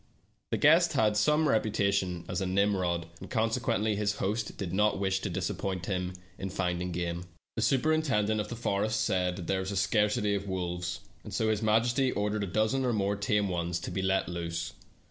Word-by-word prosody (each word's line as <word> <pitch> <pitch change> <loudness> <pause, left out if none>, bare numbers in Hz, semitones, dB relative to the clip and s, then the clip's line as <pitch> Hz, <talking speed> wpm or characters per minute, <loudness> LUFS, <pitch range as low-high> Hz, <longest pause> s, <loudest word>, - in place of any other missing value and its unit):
The - - 0
guest - - +5
had 105 -1 +3
some 150 +8 +3
reputation 100 -7 +1
as - - -2
a 95 - -1
Nimrod, 95 -3 +1
and - - -9
consequently 110 -1 +1
his 105 0 0
host 105 +3 -2
did 95 -3 -4
not 105 +1 +3
wish 95 -1 +1
to 100 - -3
disappoint 95 0 -2
him 90 -2 -2 0.3
in 95 - -3
finding 90 -1 -1
game. 85 0 -3 0.3
The - - -1
superintendent 135 -7 +2
of 105 - -5
the 120 - -5
forest 110 0 0
said 90 -1 0
there 95 +2 0
was 95 0 -3
a 100 - -2
scarcity 105 +2 +2
of 100 0 -2
wolves, 90 -1 -3 0.2
and - - -9
so 110 - +1
his 110 -2 +1
majesty 120 +4 +2
ordered 105 0 -1
a - - -2
dozen 110 +8 +1
or 125 -2 +1
more 100 -1 +1
tame 100 0 +1
ones 85 -1 -1
to - - -5
be 95 +2 -2
let 95 0 +1
loose. 85 -1 -4
100 Hz, 190 wpm, -30 LUFS, 90-110 Hz, 0.3 s, guest